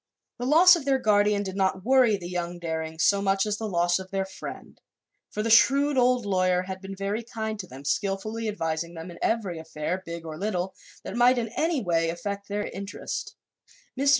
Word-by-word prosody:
The 245 - -2
loss 350 +5 +8
of 335 - -4
their 270 -1 +2
guardian 205 -3 +3
did 190 -1 -5
not 190 0 0
worry 255 -4 +5
the 175 -2 -7
young 175 -1 -3
Darings 160 -1 -3
so 200 -1 +4
much 195 0 +2
as 210 -1 -2
the 220 - -3
loss 175 0 +2
of 190 0 -9
their 195 0 -1
friend, 190 - -9 0.5
for 210 - -3
the 225 - 0
shrewd 275 +5 +5
old 250 -2 +3
lawyer 185 -2 +2
had 190 0 -6
been 195 0 -7
very 200 +3 -2
kind 220 -2 -4
to 185 - -6
them, 135 0 -11
skillfully 215 +6 -1
advising 170 -4 -3
them 165 +2 -7
in 170 - -12
every 200 -7 0
affair, 160 +3 -4
big 170 -1 -7
or 155 -1 -7
little, 190 -2 -2 0.3
that - - -6
might 245 +1 +5
in 230 -2 -1
any 310 +3 0
way 165 -2 +1
affect 200 +4 -4
their 205 0 -2
interests. 195 +1 -6 0.6
Mr. 275 +2 +2
195 Hz, 205 wpm, -26 LUFS, 175-225 Hz, 0.6 s, loss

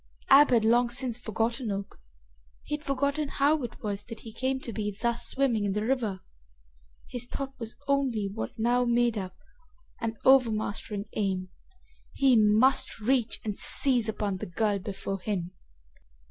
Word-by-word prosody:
Ab 285 +2 +8
had 230 -3 +3
long 240 +2 +4
since 245 -1 -1
forgotten 230 +2 -2
Oak. 195 0 -5 0.6
He 295 - -2
had 300 - -9
forgotten 280 +2 0
how 285 +3 +2
it 240 -2 -7
was 205 -1 -3
that 230 - -9
he 225 - -10
came 260 +3 -1
to 230 - -6
be 210 -2 -3
thus 235 0 0
swimming 255 -6 +1
in 200 -1 0
the 210 +1 -1
river. 225 -7 -1 0.9
His 245 -1 -5
thought 270 +1 -5
was 230 -1 -7
only 265 -7 +1
what 200 +3 -6
now 240 +2 +2
made 240 -1 +2
up 185 -3 -5 0.6
an 225 -1 -3
overmastering 215 -5 +2
aim. 190 -3 -1 0.6
He 270 -2 +4
must 220 +5 +4
reach 240 +1 0
and 210 -2 -3
seize 245 -5 +2
upon 205 -3 -2
the - - -6
girl 205 +3 0
before 195 0 -5
him! 185 -3 -3
230 Hz, 160 wpm, -28 LUFS, 210-260 Hz, 0.9 s, Ab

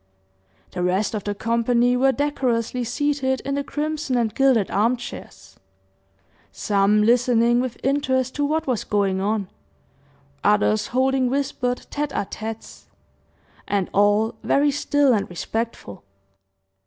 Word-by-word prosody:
The 180 - -4
rest 185 +5 0
of 210 -3 -4
the 205 0 -2
company 235 +2 +1
were 265 +2 +3
decorously 255 -4 -1
seated 270 +1 -1
in 275 - -3
the 280 0 -1
crimson 295 -2 -2
and 230 -3 0
gilded 260 -7 +2
arm 230 +5 +2
chairs, - - -10 0.9
some 205 +1 +2
listening 240 +1 +3
with 255 -2 -4
interest 260 -2 0
to 290 - -2
what 310 +2 0
was 250 -5 -1
going 195 -2 0
on, 205 -1 -1 1.0
others 210 +1 +2
holding 260 0 +1
whispered 250 -2 -2
tete 295 0 -3
a - - -1
tetes, 220 +2 -8 0.8
and 200 -3 -1
all 205 +2 +3
very 285 +1 +2
still 285 -1 +2
and 205 -3 -1
respectful. 180 - -5
245 Hz, 130 wpm, -22 LUFS, 210-270 Hz, 1.0 s, were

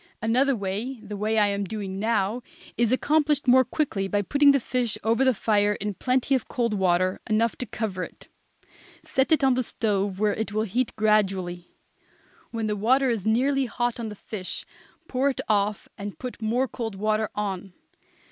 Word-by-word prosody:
Another 255 +5 +2
way 215 +5 -3
the 210 -1 -6
way 215 +2 0
I 210 -1 +4
am 200 0 -1
doing 195 -1 -5
now 215 +1 0 0.3
is 235 -1 +2
accomplished 295 +1 +2
more 260 +1 +7
quickly 250 -7 -1
by 205 +1 0
putting 285 +6 +5
the 275 - +3
fish 245 -2 -1
over 225 +4 +2
the 260 - +5
fire 210 -2 +2
in 205 0 -3
plenty 255 +6 0
of 260 -4 0
cold 235 -3 -1
water, 185 -1 +1
enough 220 +1 +2
to 250 - -4
cover 215 -4 -3
it; - - -11 0.8
set 265 +2 0
it 310 -3 +4
on 265 -1 +5
the 255 - +1
stove 205 -5 -1
where 210 0 +2
it 220 -1 -3
will 215 +1 +1
heat 230 +4 -1
gradually. 190 -5 0 0.7
When 225 -1 -3
the 210 -1 0
water 255 +5 +3
is 220 -3 -2
nearly 265 +4 +2
hot 240 0 -2
on 225 -2 -3
the 210 - -8
fish 195 -2 -5 0.4
pour 265 +2 +1
it 270 - -2
off 205 -1 +1
and 200 0 -6
put 250 -3 -7
more 240 +4 +1
cold 225 -4 -5
water 215 +2 0
on. 195 -2 -3
220 Hz, 185 wpm, -25 LUFS, 205-250 Hz, 0.8 s, more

